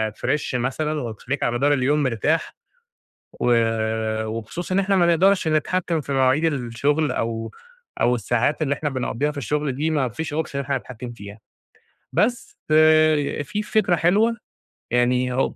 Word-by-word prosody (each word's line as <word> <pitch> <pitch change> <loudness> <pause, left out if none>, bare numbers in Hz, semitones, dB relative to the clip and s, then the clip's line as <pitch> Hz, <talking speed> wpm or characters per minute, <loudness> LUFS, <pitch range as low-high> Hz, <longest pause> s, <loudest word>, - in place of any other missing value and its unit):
فريش 150 -3 -2
مثلًا 150 +5 -1
وتخليك 125 +4 -4
على 120 - +1
مدار 140 +4 +2
اليوم 145 +2 +1
مرتاح. 130 +6 0 0.9
و 120 0 +3 0.7
وبخصوص 115 - -5
إن 185 - +2
إحنا 195 0 +2
ما 175 -2 +4
نقدرش 180 +1 +3
نتحكم 165 +2 0
في 140 -1 -5
مواعيد 135 +3 +2
الشغل 145 +1 0
أو 115 -1 -3 0.5
أو 125 - +3
الساعات 120 +6 0
اللي 140 -1 +1
إحنا 150 +1 -3
بنقضيها 135 +1 -2
في 150 - -7
الشغل 145 +2 -1
دي، 150 +5 -1
ما 145 -5 +1
فيش 150 +5 -5
option 155 -1 -3
إن 140 - -1
إحنا 140 0 -1
نتحكم 125 -1 -7
فيها، 100 -1 -11 0.7
بس 220 - 0
ف - - -1 0.7
في 210 +9 -3
فكرة 210 -4 +1
حلوة 210 +8 +2 0.6
يعني، 125 +1 +2
هو 130 - 0
145 Hz, 155 wpm, -22 LUFS, 125-160 Hz, 0.9 s, ما